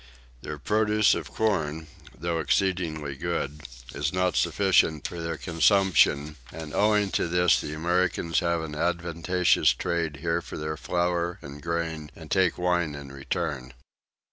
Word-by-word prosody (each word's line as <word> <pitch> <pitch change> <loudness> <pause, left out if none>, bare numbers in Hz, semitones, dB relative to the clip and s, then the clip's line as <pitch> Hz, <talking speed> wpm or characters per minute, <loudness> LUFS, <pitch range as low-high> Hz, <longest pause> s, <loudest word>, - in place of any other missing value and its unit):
Their 75 - -6
produce 105 +5 +3
of - - -4
corn, 80 -8 -1 0.3
though 85 0 -1
exceedingly 80 -5 0
good, 75 -2 -3 0.3
is 75 +1 -1
not 90 -3 0
sufficient 90 -7 +2
for 85 - -7
their 80 -1 -3
consumption; 80 -4 +3
and 80 -1 -8
owing 105 -1 +2
to - - 0
this 90 +1 +3
the 75 - -5
Americans 85 0 +1
have 85 -2 0
an 80 -2 -6
advantageous 85 +2 +1
trade 85 -4 -2
here 85 +3 -1
for - - -8
their 75 0 -3
flour 85 +1 -1
and 70 +1 -9
grain, 80 -2 -3
and 80 -2 -12
take 95 -3 +2
wine 85 -4 0
in 70 -1 -9
return. 70 -1 -4
85 Hz, 140 wpm, -26 LUFS, 75-90 Hz, 0.3 s, produce